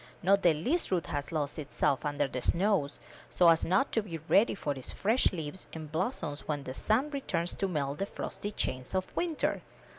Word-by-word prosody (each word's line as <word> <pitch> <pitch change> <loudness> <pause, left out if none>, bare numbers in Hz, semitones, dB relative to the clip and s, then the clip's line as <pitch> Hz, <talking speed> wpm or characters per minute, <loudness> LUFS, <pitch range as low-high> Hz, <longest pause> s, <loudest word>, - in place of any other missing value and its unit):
Not 200 +2 +4
the 170 -4 +5
least 265 - 0
root 180 -4 +1
has 145 +1 -3
lost 150 -2 -2
itself 140 -1 0
under 145 -1 0
the 125 -1 -4
snows, 180 - +1 0.3
so 175 -2 +5
as 165 -1 +4
not 190 +10 +2
to 225 - +2
be 180 -6 -6
ready 205 +2 +4
with 145 -1 +1
its 130 - -7
fresh 225 +6 +2
leaves 160 0 -5
and 155 -2 -7
blossoms 160 - -2
when 145 -2 -2
the 130 - -5
sun 240 - +1
returns 185 - -1
to 195 - -1
melt 145 -5 -2
the 195 - -1
frosty 205 - -5
chains 130 -7 -2
of 185 0 -2
winter. 335 -3 0
170 Hz, 200 wpm, -31 LUFS, 145-200 Hz, 0.3 s, the